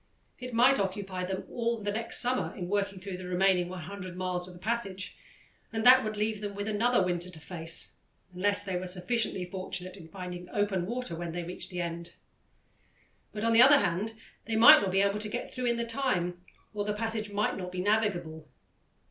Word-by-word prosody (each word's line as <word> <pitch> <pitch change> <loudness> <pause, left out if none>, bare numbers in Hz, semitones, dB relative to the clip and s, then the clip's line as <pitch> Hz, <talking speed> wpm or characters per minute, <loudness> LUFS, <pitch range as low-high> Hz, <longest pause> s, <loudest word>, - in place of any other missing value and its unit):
It 250 0 -6
might 255 +4 +5
occupy 190 -1 -2
them 190 +1 -3
all 235 -1 -1
the 205 -1 -3
next 225 +2 -1
summer 225 -8 0
in 180 -2 -5
working 200 0 -1
through 185 0 -6
the 185 0 -8
remaining 180 -1 +2
100 185 +1 -7
miles 180 -1 -2
of 180 - -11
the - - -13
passage, 195 -3 -3 0.6
and 225 0 -2
that 255 +1 +8
would 215 -1 -3
leave 215 0 -1
them 205 -1 -5
with 205 +1 -4
another 225 +1 +2
winter 175 0 -2
to 170 -3 -12
face, 165 0 -2 0.4
unless 200 +3 +2
they 190 -3 -2
were 185 +1 -4
sufficiently 185 +1 -1
fortunate 185 0 -5
in 175 -5 -12
finding 180 0 -7
open 200 -4 0
water 240 -6 -3
when 170 0 -5
they 175 0 -3
reached 180 +2 -2
the 180 -1 -3
end. 170 0 -5 1.2
But, 210 - -5
on 230 0 +3
the 230 - +7
other 280 +3 +9
hand, 210 +1 -1 0.3
they 225 - -2
might 225 +2 +9
not 200 - 0
be 195 +1 +3
able 200 +1 +1
to 210 0 -4
get 240 +3 -5
through 250 -1 -2
in 235 - +2
the 235 0 -2
time, 185 -9 -1 0.3
or 205 -1 -2
the 210 0 -1
passage 220 0 -3
might 205 +1 0
not 180 -1 -5
be 180 - -5
navigable. 180 -7 0
195 Hz, 205 wpm, -29 LUFS, 180-220 Hz, 1.2 s, other